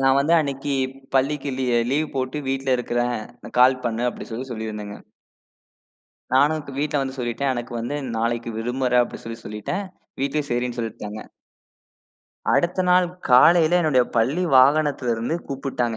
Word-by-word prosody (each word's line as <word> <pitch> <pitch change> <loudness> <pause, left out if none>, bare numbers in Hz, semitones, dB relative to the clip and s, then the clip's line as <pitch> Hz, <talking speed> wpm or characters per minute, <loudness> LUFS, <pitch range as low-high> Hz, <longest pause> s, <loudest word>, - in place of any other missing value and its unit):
நான் 135 0 +4
வந்து 150 +4 +1
அன்னைக்கி 140 -2 -2 0.4
பள்ளிக்கு 140 +1 +1
லீ 130 - -1 0.2
லீவு 150 +3 +1
போட்டு 130 +3 -2
வீட்டுல 135 -1 0
இருக்கிறேன். 120 0 -1 0.4
கால் 130 0 +5
பண்ணு 115 +1 -1
அப்டி - - -9
சொல்லி 125 +4 -4
சொல்லிருந்தேங்க. 105 -3 -5 1.4
நானும் 150 +3 +3 0.2
வீட்டுல 150 0 0
வந்து 135 0 -5
சொல்லிட்டேன். 125 +3 -1
எனக்கு 120 -1 -5
வந்து 120 +5 -3 0.2
நாளைக்கு 115 +1 -1
விடுமுற 125 +1 +1
அப்டின்னு 120 - -7
சொல்லி 115 0 -7
சொல்லிட்டேன். 105 - -4 0.4
வீட்டுல 140 +2 0
சரின்னு 120 0 -1
சொல்லிட்டாங்க. 110 -2 -5 1.3
அடுத்த 175 +2 +2
நாள் 180 0 +5 0.2
காலையில 160 +6 +6
என்னோட 150 -6 +3 0.2
பள்ளி 135 +11 +2
வாகனத்துல 140 -2 +4
இருந்து 115 +8 -2
கூப்புட்டாங்க. 130 -4 -2
130 Hz, 135 wpm, -23 LUFS, 120-145 Hz, 1.4 s, காலையில